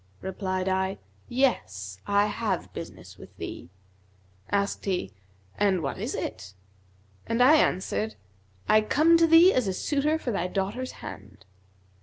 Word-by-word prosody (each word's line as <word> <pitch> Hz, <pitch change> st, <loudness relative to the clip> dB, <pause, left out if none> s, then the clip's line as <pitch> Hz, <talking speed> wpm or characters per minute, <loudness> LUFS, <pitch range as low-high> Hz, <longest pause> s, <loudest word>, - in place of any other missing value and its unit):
Replied 185 Hz, -1 st, -3 dB
I, 190 Hz, +1 st, 0 dB, 0.3 s
'Yes, 95 Hz, -, -1 dB
I 205 Hz, 0 st, +3 dB
have 210 Hz, -3 st, -2 dB
business -, -, -9 dB
with -, -, -14 dB
thee.' -, -, -7 dB, 0.8 s
Asked 200 Hz, 0 st, -1 dB
he, 180 Hz, -, -1 dB, 0.5 s
'And 195 Hz, -5 st, +2 dB
what 135 Hz, -, -3 dB
is -, -, -3 dB
it?'; 100 Hz, -, -6 dB, 0.7 s
and 230 Hz, -, -1 dB
I 275 Hz, +6 st, +7 dB
answered, 110 Hz, -, 0 dB, 0.5 s
'I 215 Hz, -, +5 dB
come 310 Hz, +9 st, +4 dB
to 330 Hz, 0 st, +4 dB
thee 330 Hz, +4 st, +7 dB
as 255 Hz, -5 st, +1 dB
a 190 Hz, -, 0 dB
suitor 295 Hz, +8 st, 0 dB
for 260 Hz, -6 st, -3 dB
thy 180 Hz, -4 st, -1 dB
daughter's 200 Hz, +8 st, -3 dB
hand.' 95 Hz, +1 st, -10 dB
200 Hz, 140 wpm, -27 LUFS, 180-255 Hz, 0.8 s, I